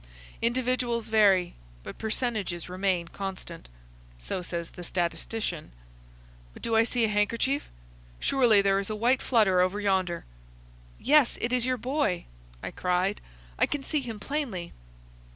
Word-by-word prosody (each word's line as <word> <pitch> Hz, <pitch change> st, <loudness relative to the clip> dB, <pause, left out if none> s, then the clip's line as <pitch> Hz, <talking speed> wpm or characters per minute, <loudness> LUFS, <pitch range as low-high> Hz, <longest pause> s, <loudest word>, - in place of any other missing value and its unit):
Individuals 240 Hz, -1 st, 0 dB
vary, 195 Hz, -5 st, +4 dB, 0.3 s
but -, -, -9 dB
percentages 220 Hz, -6 st, -2 dB
remain 185 Hz, -1 st, 0 dB
constant. 185 Hz, -, -7 dB, 0.5 s
So -, -, -3 dB
says 170 Hz, -1 st, -5 dB
the 175 Hz, -, -9 dB
statistician. 175 Hz, -, -3 dB, 0.8 s
But -, -, -13 dB
do 230 Hz, -, +1 dB
I 225 Hz, -, +6 dB
see 235 Hz, 0 st, +1 dB
a -, -, +2 dB
handkerchief? 225 Hz, +7 st, 0 dB, 0.5 s
Surely 235 Hz, -7 st, +4 dB
there 195 Hz, 0 st, +3 dB
is 200 Hz, -, -3 dB
a 215 Hz, -, -2 dB
white 245 Hz, +4 st, +2 dB
flutter 210 Hz, -7 st, +4 dB
over 185 Hz, +3 st, +1 dB
yonder." 190 Hz, -4 st, 0 dB, 0.7 s
"Yes, 290 Hz, -2 st, +4 dB
it 240 Hz, +1 st, -1 dB
is 250 Hz, 0 st, +2 dB
your 255 Hz, 0 st, +1 dB
boy," 255 Hz, -, -1 dB, 0.4 s
I -, -, -4 dB
cried. 180 Hz, +2 st, 0 dB, 0.4 s
"I -, -, +4 dB
can 290 Hz, -2 st, -3 dB
see 300 Hz, +1 st, 0 dB
him 230 Hz, -4 st, -6 dB
plainly." 235 Hz, -, -3 dB
210 Hz, 140 wpm, -28 LUFS, 185-245 Hz, 0.8 s, I